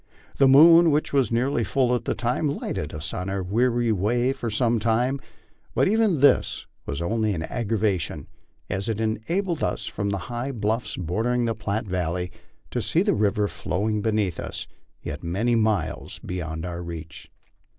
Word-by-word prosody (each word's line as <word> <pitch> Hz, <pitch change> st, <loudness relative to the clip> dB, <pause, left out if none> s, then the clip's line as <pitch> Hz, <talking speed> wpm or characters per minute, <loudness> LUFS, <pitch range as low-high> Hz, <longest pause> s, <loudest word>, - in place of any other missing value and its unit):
The 135 Hz, -, +7 dB
moon, 165 Hz, +5 st, +8 dB
which 150 Hz, 0 st, 0 dB
waa 135 Hz, -2 st, +4 dB
nearly 120 Hz, +1 st, +1 dB
full 125 Hz, +1 st, +1 dB
at 120 Hz, -2 st, -1 dB
the -, -, 0 dB
time, 120 Hz, +6 st, 0 dB
lighted 140 Hz, -, -3 dB
us 75 Hz, +1 st, -5 dB
on 90 Hz, +1 st, -3 dB
our 95 Hz, -1 st, -2 dB
weary 120 Hz, +4 st, +1 dB
way 120 Hz, +6 st, +1 dB
for 125 Hz, -4 st, -4 dB
some 115 Hz, +2 st, +1 dB
time; 120 Hz, +5 st, +1 dB, 0.5 s
but -, -, +3 dB
even 210 Hz, -7 st, +2 dB
this 145 Hz, -, +3 dB, 0.2 s
was 70 Hz, +4 st, -3 dB
only 110 Hz, +2 st, 0 dB
an 80 Hz, -, -3 dB
aggravation, 100 Hz, -, -1 dB, 0.4 s
as 95 Hz, +4 st, -3 dB
it 110 Hz, -1 st, -1 dB
enabled 155 Hz, -, -1 dB
us -, -, -1 dB
from 100 Hz, -1 st, -3 dB
the 100 Hz, -, -1 dB
high 120 Hz, +3 st, -4 dB
bluffs 110 Hz, +1 st, -1 dB
bordering 115 Hz, +8 st, 0 dB
the 115 Hz, -, 0 dB
Platte 110 Hz, +1 st, -3 dB
valley 90 Hz, -1 st, -2 dB, 0.4 s
to -, -, -1 dB
see -, -, +2 dB
the -, -, +2 dB
river 105 Hz, 0 st, +1 dB
flowing 105 Hz, +5 st, -2 dB
beneath 105 Hz, -5 st, 0 dB
us, -, -, -5 dB, 0.4 s
yet -, -, -5 dB
many 100 Hz, +8 st, 0 dB
miles 110 Hz, -3 st, 0 dB
beyond 80 Hz, -2 st, -4 dB
our 85 Hz, -1 st, -5 dB
reach. 80 Hz, -1 st, -8 dB
110 Hz, 170 wpm, -25 LUFS, 95-125 Hz, 0.5 s, moon